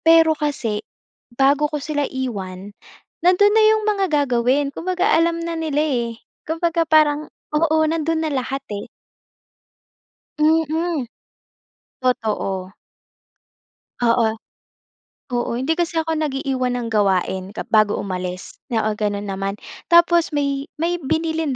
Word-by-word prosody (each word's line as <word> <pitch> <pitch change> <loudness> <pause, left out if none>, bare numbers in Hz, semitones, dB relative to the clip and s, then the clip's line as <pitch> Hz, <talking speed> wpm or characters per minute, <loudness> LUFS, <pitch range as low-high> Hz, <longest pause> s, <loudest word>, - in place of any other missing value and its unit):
Pero 325 -1 +6
kasi 280 -9 -2 0.6
bago 285 +3 +3
ko 300 - -3
sila 290 -1 -2
iwan, 200 -7 -5 0.5
nandon 370 +4 +4
na 440 0 +5
'yong 435 0 +3
mga 415 -2 +1 0.2
gagawin, 255 +3 +1
kumbaga 365 +4 0
alam 335 +1 +3
na 335 - -3
nila, 300 -2 0
eh. 245 -6 0 0.4
Kumbaga 330 0 0
parang 305 -1 +3 0.2
oo, 315 +1 +2
nandoon 320 0 0
na 310 - -1
lahat 270 +2 -4
eh. 205 - -5 1.5
Mm. 320 -1 +1 0.9
Totoo. 210 -7 -1 1.3
Oo. 230 -2 +2 1.0
Oo, 240 -1 -1
hindi 265 +6 0
kasi 340 0 -1
ako 325 0 0
nag-iiwan 270 -4 -1
ng 235 -1 -3
gawain 190 -2 +1
kap - - -4
bago 215 -1 +4
umalis 180 -1 -5 0.2
oo, 220 -3 +1
ganon 205 -1 -2
naman. 195 0 -3 0.3
Tapos 340 -1 +5
may 280 -1 -2
may 340 +2 -1
binilin 320 0 -1
285 Hz, 120 wpm, -21 LUFS, 230-325 Hz, 1.5 s, Pero